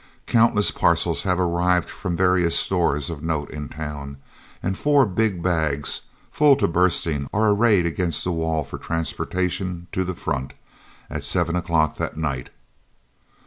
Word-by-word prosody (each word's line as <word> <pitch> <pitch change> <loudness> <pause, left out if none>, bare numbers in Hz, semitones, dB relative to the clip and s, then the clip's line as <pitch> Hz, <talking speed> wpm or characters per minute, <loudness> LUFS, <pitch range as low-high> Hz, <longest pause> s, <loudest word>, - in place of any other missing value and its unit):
Countless 115 -3 +3
parcels 85 0 +1
have 90 -2 0
arrived 90 0 +1
from 85 -2 -4
various 90 -2 +3
stores 85 -5 +1
of 75 -3 -7
note 80 -3 -2
in 75 -3 -6
town, 75 -2 -7 0.5
and 95 +1 -1
four 145 +3 +3
big 100 -3 -1
bags, 80 -5 +1 0.3
full 145 -2 +5
to 140 - +1
bursting, 85 -4 +1
are 105 +1 +2
arrayed 105 -4 +3
against 85 0 -1
the 90 - -1
wall 80 -2 -1
for - - -8
transportation 90 +2 -2
"to 95 - -1
the 90 0 -4
front" 65 -3 -4 0.5
at - - -5
7 85 -1 0
o'clock 85 -4 +1
that - - -4
night. 70 -5 -3
85 Hz, 145 wpm, -23 LUFS, 80-95 Hz, 0.5 s, full